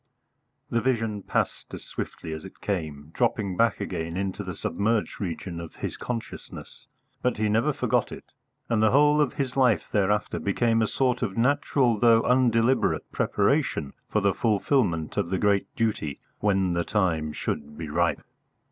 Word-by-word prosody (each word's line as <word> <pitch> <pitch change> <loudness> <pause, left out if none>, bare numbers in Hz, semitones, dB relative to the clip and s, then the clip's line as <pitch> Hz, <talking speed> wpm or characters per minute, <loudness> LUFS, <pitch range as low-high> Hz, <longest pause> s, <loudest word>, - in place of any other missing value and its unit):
The 115 - +2
vision 115 -4 0
passed - - -2
as - - -9
swiftly 80 - -6
as 80 - -6
it 95 - -12
came, 80 -6 -4
dropping 110 -6 0
back 115 +1 +2
again 85 +1 -4
into 95 +1 -2
the 90 -3 -6
submerged 110 +5 -1
region 85 -1 -4
of 85 -1 -8
his - - -4
consciousness; 115 -2 -7 0.3
but 125 -2 0
he 110 0 +1
never 115 +8 +2
forgot - - 0
it, - - -8 0.4
and 115 -2 +1
the 110 - +5
whole 150 +3 +5
of 145 - +1
his 135 -4 -2
life 125 -9 +3
thereafter 105 0 +1
became 115 +3 +1
a 110 - +2
sort 125 0 0
of 105 -5 -2
natural 125 -2 +2
though 115 -1 +5
undeliberate 125 0 +2
preparation 70 - +1 0.2
for 105 - +1
the 100 -1 +3
fulfilment 105 - +1
of - - 0
the 95 - 0
great 100 0 +2
duty 105 -11 -1 0.2
when 95 -3 +2
the 85 0 0
time 80 -5 0
should 75 0 -4
be 80 - -5
ripe. 75 - 0
105 Hz, 165 wpm, -26 LUFS, 90-120 Hz, 0.4 s, the